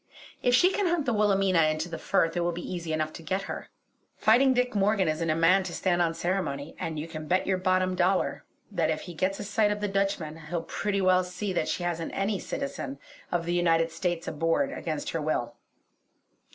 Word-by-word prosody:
If 245 Hz, 0 st, +4 dB
she 360 Hz, +9 st, +5 dB
can 400 Hz, -1 st, 0 dB
hunt 340 Hz, -4 st, +1 dB
the 245 Hz, -, +1 dB
Wilhelmina 195 Hz, -4 st, +3 dB
into 155 Hz, +2 st, 0 dB
the 165 Hz, -2 st, -6 dB
Firth 165 Hz, -4 st, +1 dB
it -, -, +1 dB
will 175 Hz, 0 st, +1 dB
be 175 Hz, +1 st, -6 dB
easy 170 Hz, -2 st, -4 dB
enough 155 Hz, 0 st, -1 dB
to -, -, -9 dB
get 190 Hz, +4 st, -2 dB
her. -, -, -6 dB, 0.5 s
"Fighting 250 Hz, +5 st, +5 dB
Dick" 250 Hz, -1 st, +1 dB
Morgan 200 Hz, -2 st, +2 dB
isn't 155 Hz, +1 st, 0 dB
a 155 Hz, -, +2 dB
man 165 Hz, +4 st, +5 dB
to 185 Hz, -2 st, -5 dB
stand 175 Hz, -2 st, +1 dB
on 165 Hz, -1 st, +1 dB
ceremony; 165 Hz, -5 st, -2 dB
and 160 Hz, -1 st, -3 dB
you 150 Hz, +2 st, -4 dB
can 155 Hz, -2 st, -7 dB
bet 185 Hz, +3 st, +2 dB
your 190 Hz, -1 st, +1 dB
bottom 185 Hz, 0 st, +2 dB
dollar 185 Hz, +1 st, +1 dB, 0.3 s
that 170 Hz, -5 st, +1 dB
if 155 Hz, -, -1 dB
he 175 Hz, -, -8 dB
gets 185 Hz, +4 st, -1 dB
a -, -, -3 dB
sight 205 Hz, +1 st, +2 dB
of 210 Hz, -, -2 dB
the 205 Hz, -, -1 dB
Dutchman 195 Hz, -5 st, -1 dB
he'll 170 Hz, -1 st, -2 dB
pretty 200 Hz, +3 st, -2 dB
well 185 Hz, 0 st, +4 dB
see 185 Hz, +2 st, -4 dB
that -, -, 0 dB
she 180 Hz, -, -2 dB
hasn't 170 Hz, -2 st, -3 dB
any 195 Hz, 0 st, 0 dB
citizen 275 Hz, 0 st, -4 dB, 0.3 s
of 175 Hz, -1 st, 0 dB
the 175 Hz, -, -1 dB
United 165 Hz, -1 st, +2 dB
States 175 Hz, -1 st, -2 dB
aboard 165 Hz, -, 0 dB
against 155 Hz, -, -4 dB
her 165 Hz, -, -2 dB
will. 120 Hz, -6 st, -1 dB
180 Hz, 220 wpm, -28 LUFS, 165-200 Hz, 0.5 s, she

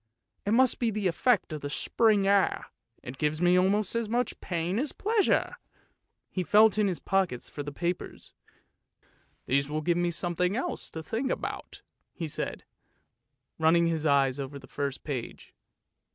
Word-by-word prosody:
It 205 Hz, -, +2 dB
must 255 Hz, 0 st, +4 dB
be 235 Hz, -, +1 dB
the 210 Hz, -2 st, -3 dB
effect 205 Hz, 0 st, +1 dB
of 150 Hz, -, -5 dB
the 145 Hz, -, -4 dB
spring 210 Hz, +6 st, +2 dB
air, 200 Hz, -1 st, +2 dB, 0.4 s
it 125 Hz, +2 st, -8 dB
gives 150 Hz, 0 st, 0 dB
me 175 Hz, +1 st, +4 dB
almost 195 Hz, +2 st, +2 dB
as 230 Hz, -2 st, -1 dB
much 245 Hz, +2 st, -1 dB
pain 175 Hz, +3 st, -2 dB
as 285 Hz, +2 st, -1 dB
pleasure! 435 Hz, +2 st, +1 dB, 0.4 s
" -, -, -52 dB
He 185 Hz, -, -2 dB
felt 215 Hz, +4 st, +5 dB
in 210 Hz, -, +3 dB
his 180 Hz, -3 st, -1 dB
pockets 190 Hz, -10 st, -1 dB
for 145 Hz, -, -5 dB
the 145 Hz, 0 st, -5 dB
papers. 175 Hz, +4 st, -4 dB, 0.5 s
" -, -, -38 dB
These 140 Hz, +2 st, +1 dB
will 155 Hz, +1 st, -2 dB
give 170 Hz, +2 st, +1 dB
me 175 Hz, 0 st, +1 dB
something 175 Hz, +2 st, -1 dB
else 260 Hz, -, -3 dB
to 160 Hz, -, -7 dB
think 235 Hz, -, -2 dB
about," -, -, -5 dB, 0.3 s
he 165 Hz, -, -4 dB
said, 150 Hz, -, -4 dB, 1.0 s
running 165 Hz, +2 st, +4 dB
his 160 Hz, -2 st, 0 dB
eyes 140 Hz, -2 st, +3 dB
over 140 Hz, +1 st, -5 dB
the 135 Hz, -, -12 dB
first 140 Hz, -1 st, -4 dB
page. 130 Hz, -6 st, -6 dB
175 Hz, 170 wpm, -28 LUFS, 150-210 Hz, 1.0 s, felt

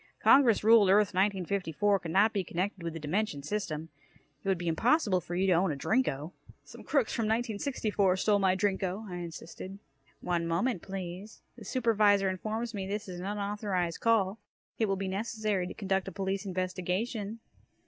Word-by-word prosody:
Congress 245 Hz, -8 st, +5 dB
ruled 220 Hz, -3 st, +6 dB
Earth 205 Hz, 0 st, +4 dB
1954 195 Hz, 0 st, +1 dB
could 170 Hz, -, -7 dB
not 205 Hz, +6 st, +4 dB
be 200 Hz, -3 st, 0 dB
connected 185 Hz, +3 st, -3 dB
with 170 Hz, -1 st, -4 dB
the 165 Hz, -, -6 dB
dimension 155 Hz, -1 st, -2 dB
system. 165 Hz, -4 st, -3 dB, 0.5 s
It -, -, -7 dB
would 190 Hz, -1 st, +2 dB
be 175 Hz, 0 st, -5 dB
impossible 205 Hz, -, +2 dB
for 175 Hz, -, -6 dB
you 185 Hz, +2 st, +1 dB
to 190 Hz, -, +4 dB
own 175 Hz, 0 st, +2 dB
a -, -, -2 dB
Drinko." 150 Hz, -, 0 dB, 0.3 s
"Some -, -, -12 dB
crooks 275 Hz, -7 st, +1 dB
from 230 Hz, -, 0 dB
1964 215 Hz, -3 st, 0 dB
stole 205 Hz, +1 st, +2 dB
my 190 Hz, -1 st, +3 dB
Drinko!" 190 Hz, +1 st, -1 dB
I 180 Hz, -2 st, -6 dB
insisted. 175 Hz, +2 st, -8 dB, 0.4 s
"One 170 Hz, -2 st, -1 dB
moment, 180 Hz, +4 st, 0 dB
please. 190 Hz, +2 st, -7 dB
The 230 Hz, -, -11 dB
Supervisor 210 Hz, -4 st, +3 dB
informs 220 Hz, +5 st, -4 dB
me 195 Hz, -2 st, -4 dB
this 205 Hz, +1 st, -4 dB
is 180 Hz, -2 st, -6 dB
an 185 Hz, -, -5 dB
unauthorized 200 Hz, -4 st, -2 dB
call. 225 Hz, -3 st, +2 dB, 0.4 s
It 220 Hz, -, +2 dB
will 195 Hz, -, +1 dB
be 195 Hz, 0 st, -3 dB
necessary 205 Hz, -1 st, -1 dB
to -, -, -7 dB
conduct 195 Hz, -2 st, -1 dB
a -, -, -4 dB
police 195 Hz, +1 st, -3 dB
investigation." 190 Hz, +4 st, -2 dB
195 Hz, 175 wpm, -30 LUFS, 180-215 Hz, 0.5 s, ruled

